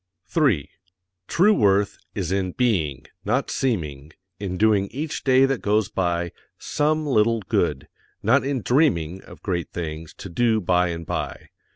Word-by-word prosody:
3. 100 - +1 0.6
TRUE 205 +5 +4
WORTH 100 - +2 0.2
is 95 -4 -2
in 95 -2 -1
BEING 80 - 0 0.2
NOT - - 0
SEEMING 75 - -2 0.3
in 95 -3 -3
doing 105 -2 +3
each 150 +8 -4
day 130 0 +5
that 135 -2 -1
goes 105 0 +1
by 85 -2 -1 0.3
SOME 155 +1 0
LITTLE 115 -4 +2
GOOD, 75 -7 -1 0.4
not 125 +7 +4
in 135 -4 -2
DREAMING 95 - +2
of - - -14
GREAT 90 -4 -2
THINGS 80 -2 -5
_to 95 - -9
do 115 +3 +2
by 90 -1 +2
and 85 -1 -4
by. - - -4
100 Hz, 150 wpm, -23 LUFS, 85-125 Hz, 0.6 s, day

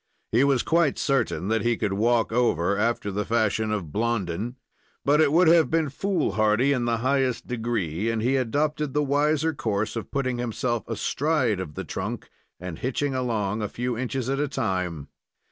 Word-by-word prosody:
He 120 +4 +4
was 140 -3 +3
quite 165 -4 +2
certain 120 - 0
that 110 0 +1
he 120 -1 +1
could 105 -3 -1
walk 115 +3 +2
over, 100 -6 +2
after 105 -1 0
the 105 +2 -1
fashion 110 -1 0
of 95 -8 -3
Blondin, 110 - -1 0.5
but 150 +2 +4
it 150 -3 +4
would 170 +2 +5
have 165 -5 +5
been 160 -2 +1
foolhardy 140 - +1
in 125 -3 -1
the 120 -1 +1
highest 130 -2 +1
degree, 115 -6 -2
and 115 -1 -1
he 125 +5 +1
adopted 145 +3 -1
the 150 - +3
wiser 150 +3 +1
course 110 -6 -2
of 115 - -5
putting 130 -3 -1
himself 120 0 -2
astride 125 - 0
of 80 -6 -6
the - - -4
trunk, - - -5 0.3
and 90 -2 -7
hitching 135 +2 -1
along 110 -5 -1
a 105 - -2
few 125 0 -3
inches 130 +1 -3
at 135 +1 -1
a 145 - +1
time. 90 - -2
120 Hz, 180 wpm, -25 LUFS, 105-140 Hz, 0.5 s, would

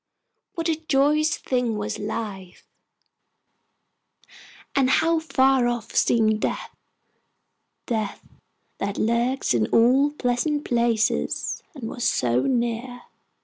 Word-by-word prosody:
What 330 -1 -2
a 320 -2 +1
joyous 300 +2 +2
thing 245 -4 -1
was 210 +1 -4
life, 205 -4 -6 2.1
and 265 -2 +3
how 325 +4 +3
far 265 -5 +2
off 240 -2 -3
seemed 220 -2 +2
death - - -3 1.1
death, 220 -4 -3 0.5
that 200 0 -3
lurks 235 - +1
in 110 -3 +1
all 255 +5 +4
pleasant 290 +2 -1
places, 235 -2 0
and 245 -6 -6
was 240 - -5
so 125 - +2
near! 245 - -2
240 Hz, 105 wpm, -24 LUFS, 220-270 Hz, 2.1 s, all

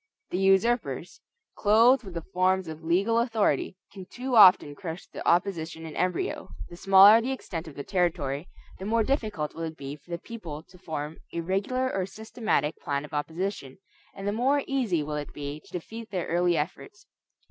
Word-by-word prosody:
The 180 - -1
usurpers, 190 - +1 0.3
clothed 230 +5 +4
with 190 -4 -10
the 165 - -4
forms 185 0 +2
of 160 0 -8
legal 195 +8 +2
authority, 220 - 0 0.2
can 190 -2 -9
too 250 +3 -3
often 185 -8 +7
crush 170 +1 -7
the - - -8
opposition 170 -2 0
in 155 - -8
embryo. 180 -1 -1 0.2
The - - -8
smaller 195 +4 +7
the 255 +3 -2
extent 170 -10 -5
of 150 - -10
the 140 - -5
territory, 170 -5 -1 0.3
the 190 - -6
more 225 +2 +2
difficult 215 - -1
will 165 - -8
it 160 -1 -5
be 140 +1 -6
for 150 +3 -23
the 170 - -3
people 170 -7 -8
to 185 - -19
form 155 -3 -5 0.2
a 170 - -1
regular 205 +9 -1
or 190 -1 -1
systematic 215 - -2
plan 140 0 -2
of 150 - -15
opposition, 160 -1 -3 0.4
and 195 +1 -6
the - - +2
more 270 +6 +2
easy 230 - 0
will 150 0 -4
it 145 - -6
be 145 +1 -6
to - - -18
defeat 225 +6 -7
their 185 -4 -2
early 175 0 +2
efforts. 150 +7 -5
180 Hz, 185 wpm, -27 LUFS, 160-215 Hz, 0.4 s, often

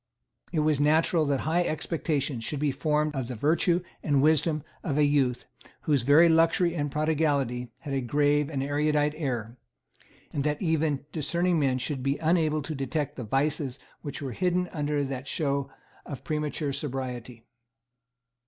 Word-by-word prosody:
It 155 - +1
was 150 -2 +2
natural 155 +2 +3
that 140 -2 +1
high 170 +3 +1
expectations 150 -6 -2
should 145 +4 -4
be 145 -1 +1
formed 150 +2 0
of 130 -3 -2
the 125 - -5
virtue 170 - +2 0.2
and 145 -3 +2
wisdom 155 +1 +2 0.2
of 145 -5 -1
a 150 - +4
youth 140 -4 +2 0.4
whose 145 -4 +2
very 145 +7 +6
luxury 165 +1 +3
and 145 -3 -1
prodigality 145 -5 0
had 145 -3 -5
a 135 - 0
grave 145 +3 +2
and 135 -4 -2
erudite 150 +1 +1
air, 125 -6 -3 0.8
and 140 - -1
that 150 0 0
even 160 -5 0
discerning 170 +2 0
men 135 -3 +2
should 130 +1 -3
be 135 +2 0
unable 155 -2 +1
to 155 - -4
detect 140 +1 -2
the 125 - -5
vices 135 +3 -1 0.2
which 145 -1 -6
were 135 - -3
hidden 180 +5 0
under 145 -1 0
that 135 -1 -5
show 140 -4 -1 0.3
of 140 - -8
premature 150 -2 -2
sobriety. 125 -4 -5
145 Hz, 160 wpm, -27 LUFS, 135-155 Hz, 0.8 s, very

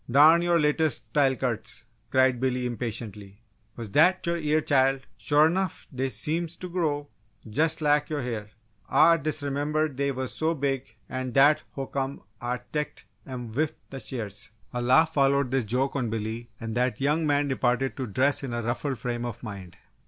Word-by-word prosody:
Darn 155 +6 +7
your 175 -1 +3
latest 150 -5 +1
style 135 +3 +2
cuts!" 125 -4 -3 0.3
cried 130 -2 +3
Billy 125 -1 0
impatiently. 110 -3 -5 0.3
"Wuz 115 -2 -5
dat 180 - +4
yo' 170 - +1
eah, 155 -2 +1
Chile? 135 -2 +2
Shore 150 +1 +4
'nuff 185 +1 -1
dey 130 +1 -1
seems 160 +9 -1
to 180 - -7
grow 155 -5 -1 0.4
jus' 155 +8 +1
lak 150 -1 +2
yo' 150 -2 -2
ha'r! 115 -5 -4 0.4
Ah 165 +2 +6
disremembered 150 0 -1
dey 140 0 +1
wuz 130 -1 -2
so 160 +1 0
big, 135 -4 -2
an' 130 -1 -4
dat 145 +3 +6
ho'come 135 0 -3 0.2
Ah 120 +1 -1
teched 150 -1 -3 0.2
'em 125 -4 -6
wif 150 +5 0 0.2
d' 135 -1 -6
shears!" 105 -6 -5 0.2
A 120 - -2
laugh 135 +7 +4
followed 140 -2 +2
this 130 -3 +1
joke 130 +6 0
on 125 -4 -1
Billy 110 +2 -4
and 115 -1 -5
that 125 -2 0
young 150 +3 +1
man 145 0 +2
departed 130 -1 0
to 130 -2 -3
dress 130 +7 +1
in 135 -4 -5
a 120 0 -2
ruffled 130 +3 -2
frame 120 +1 -3
of 120 -1 -6
mind. 95 -5 -8
135 Hz, 175 wpm, -27 LUFS, 120-150 Hz, 0.4 s, Darn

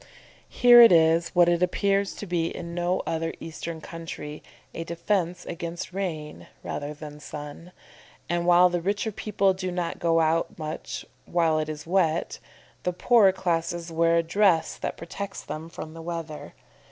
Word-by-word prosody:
Here 240 -1 +8
it 230 - +9
is, 165 0 +4
what 175 -1 +6
it 175 0 +2
appears 195 +2 +1
to - - -7
be 175 -3 0
in 170 0 -6
no 175 +1 0
other 165 0 -2
Eastern 165 0 -6
country, 155 -3 -7 0.3
a 165 - -4
defence 175 +1 -2
against 170 +2 -6
rain 165 -6 -5 0.2
rather 145 +1 -5
than 150 0 -9
sun, 150 +4 -9 0.6
and 175 0 -1
while 175 +1 +7
the 175 -1 -1
richer 200 +4 -1
people 200 -2 +1
do 185 0 -4
not 175 -1 -3
go 165 -1 +2
out 165 +1 +1
much 155 -1 -5 0.2
while 165 -2 +2
it 155 0 -2
is 150 -1 -6
wet, 170 -2 0 0.4
the 180 - -1
poorer 210 +1 +5
classes 170 -2 -2
wear 165 +1 +3
a 170 - +2
dress 165 -1 +2
that - - -4
protects 195 +4 -6
them 160 +2 -7
from 155 -1 -8
the 165 - -9
weather. 165 -2 -6
170 Hz, 165 wpm, -26 LUFS, 165-180 Hz, 0.6 s, it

